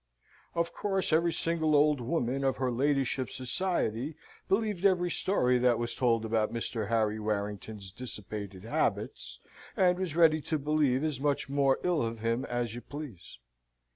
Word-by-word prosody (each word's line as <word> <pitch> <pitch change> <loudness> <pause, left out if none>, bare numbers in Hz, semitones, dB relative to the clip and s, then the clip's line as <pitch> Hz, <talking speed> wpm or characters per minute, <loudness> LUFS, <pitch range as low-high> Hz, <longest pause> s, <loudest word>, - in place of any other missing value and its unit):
Of 170 0 0
course 195 -5 -1
every 170 +2 +3
single 160 -2 +1
old 145 -2 +4
woman 130 0 -1
of 135 -1 +1
her 130 -1 0
ladyship's 135 0 0
society 130 - -1 0.3
believed 205 -2 0
every 180 -3 +3
story 125 -12 +2
that 120 -1 +3
was 120 0 -2
told 115 -3 +1
about 110 -1 +1
Mr. 115 -2 -3
Harry 110 -2 +1
Warrington's 105 -1 -4
dissipated 100 -4 -7
habits, 65 - -2 0.4
and 180 -1 +3
was 180 -5 -2
ready 160 -2 +5
to 155 - -1
believe 145 -2 +1
as 155 -5 -1
much 140 -2 0
more 140 -1 +3
ill 175 -3 +2
of 115 0 -2
him 115 +3 -1
as 120 -3 -2
you 120 - -6
please. 140 - -9
130 Hz, 155 wpm, -30 LUFS, 115-155 Hz, 0.4 s, ready